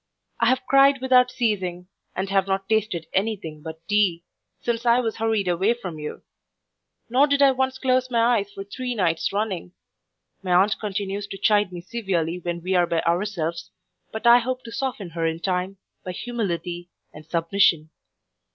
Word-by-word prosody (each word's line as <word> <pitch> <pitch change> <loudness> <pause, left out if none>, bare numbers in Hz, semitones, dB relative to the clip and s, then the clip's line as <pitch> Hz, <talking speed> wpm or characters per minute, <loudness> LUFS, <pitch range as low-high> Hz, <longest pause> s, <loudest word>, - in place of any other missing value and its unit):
I 235 - +3
have 255 +2 +2
cried 275 0 +5
without 255 -1 +4
ceasing, 190 -8 -2 0.3
and 190 +1 -2
have 195 -1 +2
not 195 0 -1
tasted 215 -7 0
any 215 +3 +1
thing 160 -6 -9
but 160 +1 -9
tea, 195 -5 +2 0.4
since 235 -1 -2
I 240 0 +4
was 225 -3 -2
hurried 220 -3 0
away 190 +6 +2
from 180 -9 -7
you; 150 - -7 0.8
nor 260 +5 +4
did 280 -1 +2
I 275 - +7
once 260 0 -1
close 255 -1 +1
my 235 0 +3
eyes 200 0 -6
for 195 - -7
three 250 +5 -5
nights 170 -6 0
running. 200 -4 -3 0.7
My 185 -2 -1
aunt 195 +4 +3
continues 200 -1 -3
to 195 - -7
chide 205 -1 +2
me 175 -1 -7
severely 180 -5 -2
when 170 -1 -4
we 185 +1 -1
are 175 -1 +3
by 165 -1 0
ourselves; 170 -2 -2 0.4
but 220 - -6
I 235 +1 +8
hope 255 +1 -3
to 230 - -9
soften 230 -7 -4
her 165 0 -1
in 160 0 -2
time, 185 +2 -2 0.3
by 185 - -5
humility 180 -6 -4 0.2
and 150 - -11
submission. 165 -1 +1
195 Hz, 180 wpm, -24 LUFS, 175-235 Hz, 0.8 s, I